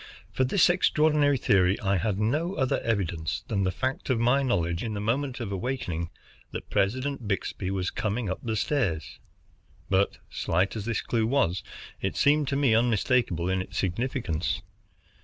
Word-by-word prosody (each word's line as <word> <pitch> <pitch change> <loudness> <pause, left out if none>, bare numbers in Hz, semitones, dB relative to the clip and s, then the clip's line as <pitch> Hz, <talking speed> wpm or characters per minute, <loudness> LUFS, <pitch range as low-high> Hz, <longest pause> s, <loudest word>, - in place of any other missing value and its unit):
For 130 - +1
this 150 +9 +4
extraordinary 150 -5 +3
theory 95 -3 +3
I 100 -4 +1
had 95 +3 0
no 150 - 0
other 130 -3 +1
evidence 90 -8 -2
than 100 -4 0
the 95 - +1
fact 130 +10 -3
of 125 -3 +2
my 125 +4 +3
knowledge 85 -9 0
in 110 -2 -3
the - - -3
moment 125 +5 -1
of 115 -5 -4
awaking 90 -6 -3 0.4
that - - -7
President 130 +4 0
Byxbee 100 -1 -2
was 95 -2 -1
coming 105 +3 -2
up 95 - -2
the 110 -2 -2
stairs. 100 - -1 0.7
But 95 +1 +2
slight 90 +6 0
as 105 -2 -4
this 115 -1 -1
clue 115 -2 0
was, 95 -9 +1 0.4
it - - -2
seemed 145 0 +3
to 140 - 0
me 140 -5 +3
unmistakable 115 -5 +2
in 95 0 +1
its 95 +1 -7
significance. 90 - -1
110 Hz, 165 wpm, -27 LUFS, 95-130 Hz, 0.7 s, this